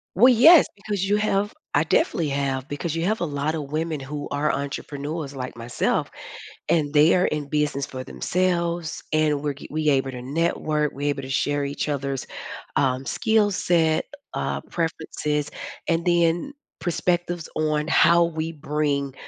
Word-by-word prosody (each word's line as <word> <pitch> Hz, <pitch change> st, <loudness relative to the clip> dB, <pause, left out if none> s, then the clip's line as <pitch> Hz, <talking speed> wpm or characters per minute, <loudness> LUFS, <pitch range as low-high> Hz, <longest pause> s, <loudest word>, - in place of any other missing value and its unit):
Well, 250 Hz, +7 st, +7 dB
yes, 310 Hz, +7 st, +8 dB
because 200 Hz, -1 st, -3 dB
you 205 Hz, +1 st, +3 dB
have 205 Hz, 0 st, 0 dB, 0.2 s
I 145 Hz, -, +4 dB
definitely 160 Hz, 0 st, +1 dB
have, 135 Hz, -1 st, -1 dB
because 145 Hz, +3 st, -3 dB
you 165 Hz, +1 st, -1 dB
have 215 Hz, +3 st, 0 dB
a -, -, +1 dB
lot 145 Hz, 0 st, -1 dB
of 145 Hz, -3 st, -5 dB
women 155 Hz, 0 st, -1 dB
who 145 Hz, +2 st, -5 dB
are 150 Hz, +1 st, +1 dB
entrepreneurs, 140 Hz, +1 st, -4 dB
like 130 Hz, -1 st, -5 dB
myself, 120 Hz, +1 st, -1 dB, 0.6 s
and 155 Hz, -3 st, +2 dB
they 150 Hz, +2 st, +5 dB
are 180 Hz, -, +3 dB
in 150 Hz, -1 st, -2 dB
business 145 Hz, -2 st, 0 dB
for 130 Hz, -1 st, -7 dB
themselves, 170 Hz, +2 st, -1 dB
and 150 Hz, -2 st, +2 dB
we're 145 Hz, -, -1 dB
ge 140 Hz, -, -11 dB
we 155 Hz, 0 st, 0 dB
able 135 Hz, -1 st, +1 dB
to 125 Hz, -1 st, -7 dB
network, 150 Hz, +1 st, 0 dB
we 145 Hz, +1 st, -3 dB
able 140 Hz, -1 st, -1 dB
to 130 Hz, -, -8 dB
share 145 Hz, +1 st, 0 dB
each 140 Hz, +2 st, -3 dB
other's, 140 Hz, -2 st, -2 dB, 0.5 s
um, 130 Hz, -1 st, +1 dB
skill 220 Hz, +3 st, +2 dB
set, 165 Hz, -4 st, +2 dB, 0.3 s
uh, -, -, -2 dB
preferences, 150 Hz, -3 st, -2 dB, 0.4 s
and 165 Hz, 0 st, +1 dB
then 175 Hz, +8 st, +2 dB, 0.3 s
perspectives 175 Hz, -1 st, -1 dB
on 155 Hz, 0 st, 0 dB
how 170 Hz, +1 st, +5 dB
we 165 Hz, -1 st, -2 dB
bring 145 Hz, -2 st, -1 dB
155 Hz, 160 wpm, -24 LUFS, 140-170 Hz, 0.6 s, yes